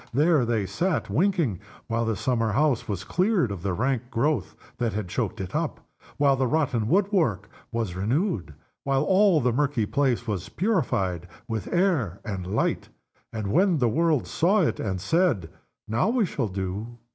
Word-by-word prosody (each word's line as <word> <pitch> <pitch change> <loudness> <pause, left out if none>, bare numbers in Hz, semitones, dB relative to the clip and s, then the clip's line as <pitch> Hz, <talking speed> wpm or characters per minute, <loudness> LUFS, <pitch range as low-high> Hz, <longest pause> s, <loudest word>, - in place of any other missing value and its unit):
There 150 0 +3
they 115 -4 0
sat 175 - -1
winking, 165 - +1 0.3
while 115 0 -1
the 115 -1 0
summer 115 -1 0
house 140 -1 +1
was 95 -3 -3
cleared 180 - +1
of 100 -4 -5
the 95 0 -1
rank 125 +1 -1
growth 135 - 0 0.2
that 115 -2 0
had 105 -3 -3
choked 110 +1 -2
it 95 -2 -5
up, - - -1 0.4
while 140 -1 +4
the 130 -1 +1
rotten 135 -6 0
wood 195 - +2
work 115 - 0 0.2
was 115 -6 -2
renewed, 105 - -1 0.3
while 135 0 +1
all 190 0 +4
the 125 -1 +1
murky 135 -4 +1
place 130 -1 0
was 100 -3 -3
purified 100 - 0 0.2
with 110 -3 -4
air 165 - +1
and 95 -5 -4
light. 100 +4 -1 0.4
And 105 -3 -3
when 180 +1 +3
the 125 -4 +2
world 160 +1 +2
saw 195 +6 +2
it, - - 0
and 95 -3 -2
said, 110 - +1 0.4
"Now 115 - +1
we 240 -2 +2
shall 135 -9 -2
do!" 100 +5 -5
120 Hz, 170 wpm, -26 LUFS, 105-160 Hz, 0.4 s, while